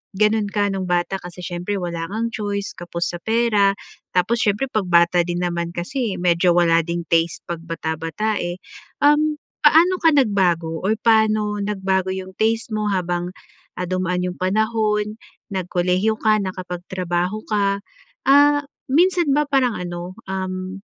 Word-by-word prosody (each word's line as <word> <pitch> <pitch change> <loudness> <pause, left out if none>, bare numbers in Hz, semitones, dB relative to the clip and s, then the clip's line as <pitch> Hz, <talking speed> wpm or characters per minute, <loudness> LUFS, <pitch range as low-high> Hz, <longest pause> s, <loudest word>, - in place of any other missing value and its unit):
ganon 210 +1 +3
ka 205 0 +1
nung 190 -1 -2
bata 175 +2 0
kasi 175 0 -10
siyempre 175 +3 -3
wala 170 -2 -3
ngang 225 +3 -2
choice, 205 -1 -3
kapos 175 0 -3
sa - - -7
pera 220 -3 +3 0.4
tapos 220 +6 +2
siyempre 210 +6 +1
'pag 215 -5 0
bata 170 0 +4
din 175 0 -3
naman 170 -1 -2
kasi 225 +3 -3
medyo 175 0 +3
wala 165 -1 +4
ding 170 0 -3
taste 165 0 +2
'pag 170 -1 -5
bata-bata, 165 +6 -3
eh. 175 +1 -4 0.4
Uhm, 300 +1 +3 0.2
paano 325 +5 +6
ka 325 - +6
nagbago 180 - +1
or 215 +3 +2
paano 215 -2 +2
nagbago 190 -2 0
yung 190 0 -6
taste 225 +1 +1
mo 210 -1 -1
habang, 175 -1 -1 0.5
ah, 180 - -2
dumaan 180 -1 -1
yung 180 0 -4
panahon, 210 +2 0 0.4
nag-kolehiyo 185 +3 +1
ka, 215 -1 +3
naka-pagtrabaho 180 +1 -3
ka? 200 -1 +1 0.5
Ah, 290 +1 +6 0.3
minsan 345 -1 +3
ba 295 0 +1
parang 260 -6 +1
ano, 175 +1 -6
uhm, 185 0 -4
190 Hz, 145 wpm, -21 LUFS, 175-220 Hz, 0.5 s, paano